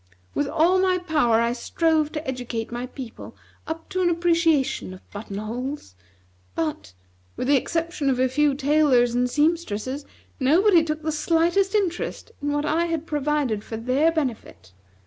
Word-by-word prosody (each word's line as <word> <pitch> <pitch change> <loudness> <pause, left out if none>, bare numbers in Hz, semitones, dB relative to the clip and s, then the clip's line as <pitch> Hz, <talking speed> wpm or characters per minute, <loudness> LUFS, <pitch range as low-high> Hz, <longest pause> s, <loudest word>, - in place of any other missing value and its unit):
With 290 - 0
all 335 +5 +3
my 370 -1 +3
power 300 -10 +2
I 235 +1 +1
strove 310 +4 +1
to 305 -1 -5
educate 245 -3 -4
my 240 +1 -4
people 250 -3 -9 0.3
up 325 0 -5
to 370 - -1
an 355 - +3
appreciation 330 - +1
of 185 - -19
button 205 -1 -7
holes; 245 - -5 0.6
but, 150 - -3 0.4
with 250 - -2
the 285 - +5
exception 330 +1 -1
of 260 - +1
a 260 +1 +3
few 285 +2 +2
tailors 275 -4 +3
and 250 +1 +1
seamstresses, 290 -3 -1 0.3
nobody 335 +6 +5
took 310 -1 -3
the 315 - 0
slightest 340 +6 +1
interest 385 +2 -2
in 290 0 -1
what 290 +1 0
I 325 +3 +1
had 330 -2 -2
provided 295 -8 -1
for 225 - -6
their 260 +8 +2
benefit. 245 - -4
295 Hz, 160 wpm, -24 LUFS, 245-330 Hz, 0.6 s, the